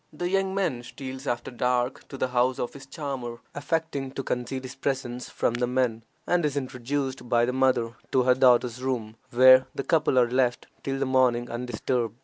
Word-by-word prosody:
The 175 Hz, +4 st, -3 dB
young 195 Hz, 0 st, +1 dB
man 180 Hz, -11 st, 0 dB
steals 130 Hz, +2 st, -8 dB
after 120 Hz, +1 st, -2 dB
dark 125 Hz, +1 st, -1 dB
to 135 Hz, -, -8 dB
the 130 Hz, -, -1 dB
house 125 Hz, +1 st, +2 dB
of 120 Hz, -, -3 dB
his 135 Hz, -1 st, -11 dB
charmer, 135 Hz, -6 st, -5 dB, 0.2 s
affecting 145 Hz, -2 st, -2 dB
to 135 Hz, -, -4 dB
conceal 125 Hz, +2 st, -3 dB
his 130 Hz, 0 st, -7 dB
presence 130 Hz, -3 st, -3 dB
from -, -, 0 dB
the 120 Hz, +1 st, 0 dB
men, 125 Hz, -3 st, 0 dB, 0.2 s
and 175 Hz, -1 st, +2 dB
is 145 Hz, -2 st, 0 dB
introduced 130 Hz, 0 st, -3 dB
by 120 Hz, -1 st, +4 dB
the 125 Hz, -, -2 dB
mother 130 Hz, -3 st, +2 dB, 0.2 s
to 130 Hz, -, +3 dB
her 125 Hz, 0 st, +5 dB
daughter's 125 Hz, -1 st, +3 dB
room, 120 Hz, -4 st, -2 dB
where 130 Hz, +1 st, +7 dB
the 140 Hz, -, -2 dB
couple 155 Hz, -4 st, +2 dB
are 125 Hz, -1 st, +5 dB
left 125 Hz, -1 st, +1 dB, 0.2 s
till 135 Hz, 0 st, -2 dB
the 135 Hz, -, 0 dB
morning 125 Hz, -2 st, +2 dB
undisturbed. 120 Hz, -1 st, -2 dB
130 Hz, 190 wpm, -26 LUFS, 120-135 Hz, 0.2 s, where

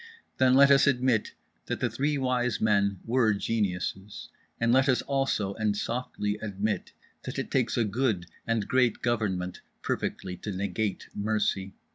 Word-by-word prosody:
Then 130 Hz, 0 st, +5 dB
let 140 Hz, +1 st, +7 dB
us 140 Hz, 0 st, +6 dB
admit 125 Hz, -5 st, +2 dB, 0.3 s
that -, -, -2 dB
the -, -, +1 dB
Three 145 Hz, +2 st, -1 dB
Wise 125 Hz, -2 st, 0 dB
Men 100 Hz, -3 st, +2 dB
were 115 Hz, -3 st, +3 dB
geniuses. 100 Hz, -2 st, -3 dB, 0.3 s
And 115 Hz, 0 st, +3 dB
let 130 Hz, +1 st, +4 dB
us, 130 Hz, -, +2 dB
also 135 Hz, -8 st, 0 dB
and 105 Hz, -1 st, -1 dB
softly, 105 Hz, -3 st, -2 dB
admit 105 Hz, 0 st, -2 dB, 0.3 s
that -, -, -6 dB
it -, -, -4 dB
takes 125 Hz, -2 st, +1 dB
a 120 Hz, -, +3 dB
good 105 Hz, -4 st, 0 dB, 0.2 s
and 115 Hz, -3 st, 0 dB
great 125 Hz, -3 st, +2 dB
government 95 Hz, -7 st, -1 dB, 0.2 s
perfectly 90 Hz, -1 st, -3 dB
to 105 Hz, -, -5 dB
negate 100 Hz, +2 st, -2 dB
mercy. 105 Hz, -2 st, -1 dB
110 Hz, 150 wpm, -28 LUFS, 100-125 Hz, 0.3 s, let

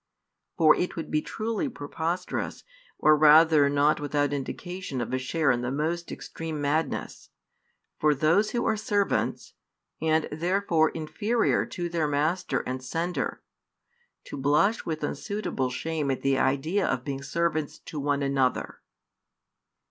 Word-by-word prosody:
For 155 Hz, -3 st, +6 dB
it 180 Hz, -, -2 dB
would 165 Hz, -, -6 dB
be 155 Hz, -, +2 dB
truly 225 Hz, -, -3 dB
preposterous, 165 Hz, -, -4 dB, 0.3 s
or 155 Hz, 0 st, +5 dB
rather 155 Hz, -1 st, +6 dB
not 145 Hz, +2 st, +3 dB
without 145 Hz, -1 st, 0 dB
indication 160 Hz, +2 st, -5 dB
of 120 Hz, +1 st, -3 dB
a 130 Hz, -, +1 dB
share 150 Hz, +3 st, +1 dB
in 120 Hz, 0 st, 0 dB
the 125 Hz, -, -2 dB
most 160 Hz, +5 st, -2 dB
extreme 160 Hz, -2 st, -6 dB
madness, 145 Hz, +3 st, -2 dB, 0.7 s
for 150 Hz, -1 st, +3 dB
those 165 Hz, +9 st, +3 dB
who 240 Hz, +1 st, -1 dB
are 220 Hz, -, +2 dB
servants, 205 Hz, -2 st, -1 dB, 0.5 s
and 160 Hz, 0 st, +2 dB
therefore 170 Hz, 0 st, +1 dB
inferior 210 Hz, +9 st, 0 dB
to 175 Hz, -2 st, -4 dB
their 165 Hz, -3 st, 0 dB
Master 150 Hz, +5 st, 0 dB
and 130 Hz, +1 st, -5 dB
Sender, 165 Hz, +7 st, -3 dB, 0.8 s
to -, -, -8 dB
blush 150 Hz, +11 st, +2 dB
with 155 Hz, -2 st, -3 dB
unsuitable 200 Hz, -11 st, -2 dB
shame 155 Hz, +3 st, -2 dB
at 135 Hz, -, -2 dB
the 135 Hz, 0 st, +3 dB
idea 160 Hz, +9 st, +1 dB
of 125 Hz, -, -1 dB
being 135 Hz, -1 st, -4 dB
servants 155 Hz, +1 st, -1 dB
to 155 Hz, -, -8 dB
one 145 Hz, 0 st, 0 dB
another. 135 Hz, -2 st, 0 dB
155 Hz, 140 wpm, -27 LUFS, 140-175 Hz, 0.8 s, For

